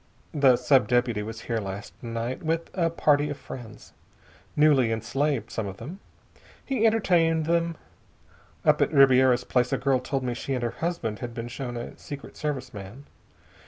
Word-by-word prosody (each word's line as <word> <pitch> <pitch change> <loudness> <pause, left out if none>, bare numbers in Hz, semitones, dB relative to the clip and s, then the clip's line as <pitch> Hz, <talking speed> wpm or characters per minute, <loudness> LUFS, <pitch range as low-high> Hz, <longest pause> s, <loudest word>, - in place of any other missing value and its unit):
The 135 -4 +5
sub 125 +2 +3
deputy 120 -3 +1
was 110 +1 -6
here 115 -1 -2
last 100 -1 -6
night 115 +4 -4
with 165 0 -2
a 170 -3 +1
party 150 -3 +2
of 145 - -4
friends. 115 -4 -10 0.6
Newly 145 -6 +4
enslaved, 115 +2 -1
some 110 -3 -3
of 95 0 -7
them. 160 - -8 0.7
He 255 -5 +2
entertained 170 -7 +2
them.... 170 0 +1 0.9
Up - - +4
at - - +3
Ribiera's 130 -3 +5
place 125 0 +1
a - - +2
girl 135 -1 +2
told 135 +1 -3
me 125 -1 -1
she 135 +3 -3
and 125 - -3
her 120 - 0
husband 165 -11 -3
had 120 -1 -6
been 120 0 -5
shown 120 -1 -5
a 120 - -6
Secret 145 -1 -9
Service 135 -4 -4
man. 105 +7 -9
130 Hz, 170 wpm, -26 LUFS, 115-150 Hz, 0.9 s, The